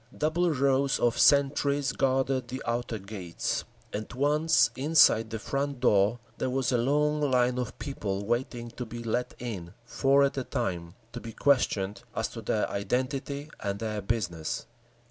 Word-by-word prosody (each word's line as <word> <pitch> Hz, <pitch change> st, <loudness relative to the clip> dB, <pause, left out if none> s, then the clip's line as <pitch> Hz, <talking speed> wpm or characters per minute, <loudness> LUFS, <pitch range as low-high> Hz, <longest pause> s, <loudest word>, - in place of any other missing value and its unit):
Double 170 Hz, +3 st, +1 dB
rows 135 Hz, -2 st, +2 dB
of 120 Hz, -1 st, +1 dB
sentries 140 Hz, -1 st, +3 dB
guarded 130 Hz, -1 st, +1 dB
the 130 Hz, +3 st, -6 dB
outer 120 Hz, -1 st, -2 dB
gates, 95 Hz, -4 st, -4 dB, 0.3 s
and 105 Hz, +1 st, -4 dB
once 150 Hz, +5 st, +3 dB
inside 135 Hz, -6 st, +5 dB
the 110 Hz, -, -3 dB
front 140 Hz, +4 st, -2 dB
door 105 Hz, -2 st, +3 dB, 0.2 s
there -, -, 0 dB
was 130 Hz, 0 st, 0 dB
a 125 Hz, -, +3 dB
long 150 Hz, +4 st, +2 dB
line 125 Hz, -1 st, +2 dB
of 125 Hz, -3 st, -4 dB
people 100 Hz, -8 st, -4 dB
waiting 120 Hz, +1 st, -2 dB
to 125 Hz, -, -6 dB
be 120 Hz, 0 st, -7 dB
let 120 Hz, +2 st, -2 dB
in, 95 Hz, -8 st, -6 dB
four 135 Hz, +3 st, +3 dB
at 140 Hz, -, +1 dB
a -, -, -2 dB
time, 85 Hz, -7 st, -3 dB, 0.2 s
to 120 Hz, -, -5 dB
be 115 Hz, -, -8 dB
questioned 105 Hz, -8 st, +1 dB
as -, -, 0 dB
to -, -, -8 dB
their -, -, 0 dB
identity 135 Hz, +7 st, -2 dB
and 100 Hz, -1 st, -2 dB
their 105 Hz, -1 st, -3 dB
business. 90 Hz, -7 st, -2 dB
125 Hz, 160 wpm, -28 LUFS, 110-140 Hz, 0.3 s, inside